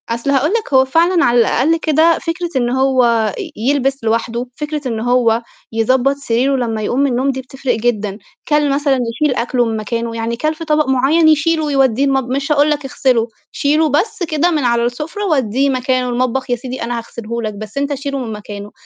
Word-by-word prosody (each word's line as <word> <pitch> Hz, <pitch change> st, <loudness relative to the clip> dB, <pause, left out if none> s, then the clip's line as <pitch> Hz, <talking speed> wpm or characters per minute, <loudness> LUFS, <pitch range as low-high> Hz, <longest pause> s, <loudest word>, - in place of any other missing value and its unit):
أصل 235 Hz, +4 st, -2 dB
هاقول 280 Hz, +2 st, +2 dB
لك 450 Hz, -10 st, -2 dB
هو 265 Hz, 0 st, +6 dB
فعلًا 335 Hz, +5 st, +3 dB
على 240 Hz, 0 st, +3 dB
الأقل 280 Hz, +7 st, +2 dB
كده، 320 Hz, +1 st, +3 dB
فكرة 340 Hz, +1 st, -3 dB
إن 240 Hz, -2 st, +1 dB
هو 245 Hz, -5 st, +2 dB
ي -, -, -6 dB, 0.2 s
يلبس 275 Hz, -1 st, 0 dB
لوحدُه، 230 Hz, +2 st, -1 dB
فكرة 300 Hz, -2 st, -4 dB
إن 225 Hz, -3 st, -2 dB
هو 235 Hz, -1 st, +2 dB, 0.3 s
يضبّط 255 Hz, +4 st, +2 dB
سريره 270 Hz, 0 st, 0 dB
لمّا 230 Hz, -4 st, -2 dB
يقوم 240 Hz, +5 st, -1 dB
من 280 Hz, -1 st, +2 dB
النوم 260 Hz, +3 st, +1 dB
دي 265 Hz, 0 st, -5 dB
بتفرِق 260 Hz, 0 st, -3 dB
جدًا، 215 Hz, -3 st, -1 dB, 0.3 s
كَلْ 295 Hz, -1 st, +2 dB
مثلًا 280 Hz, -2 st, +1 dB, 0.2 s
يشيل 295 Hz, -4 st, +2 dB
أكلُه 245 Hz, 0 st, 0 dB
من 225 Hz, -1 st, -2 dB
مكانه، 230 Hz, +2 st, -3 dB
يعني 230 Hz, +1 st, -2 dB
كَلْ 310 Hz, +5 st, 0 dB
في 330 Hz, -, -7 dB
طبق 305 Hz, -2 st, +1 dB
معيّن 275 Hz, +6 st, +3 dB
يشيله 315 Hz, +1 st, +3 dB
ويوديه 270 Hz, -3 st, +2 dB
المطب 270 Hz, -2 st, 0 dB
مش 275 Hz, +3 st, -2 dB
هاقول 295 Hz, 0 st, +4 dB
لك 295 Hz, -1 st, -1 dB
اغسله، 260 Hz, -4 st, +1 dB, 0.2 s
شيلُه 305 Hz, +2 st, +1 dB
بس 355 Hz, -, 0 dB
كده 320 Hz, +1 st, +1 dB
من 305 Hz, -4 st, 0 dB
على 235 Hz, -1 st, +2 dB
السُفْرة، 300 Hz, -, -4 dB
ودّيه 270 Hz, -, +1 dB
مكانه 255 Hz, -1 st, 0 dB
المطبخ 255 Hz, +1 st, -1 dB
يا 245 Hz, -, +2 dB
سيدي 250 Hz, +1 st, -6 dB
أنا 240 Hz, +1 st, -3 dB
هاغسله 235 Hz, 0 st, -6 dB
لك، 215 Hz, -2 st, -3 dB
بس 215 Hz, +3 st, -9 dB
أنت 285 Hz, +1 st, 0 dB
شيلُه 275 Hz, 0 st, -4 dB
من 240 Hz, -4 st, -4 dB
مكانه، 205 Hz, -1 st, -8 dB
260 Hz, 200 wpm, -17 LUFS, 235-295 Hz, 0.3 s, هو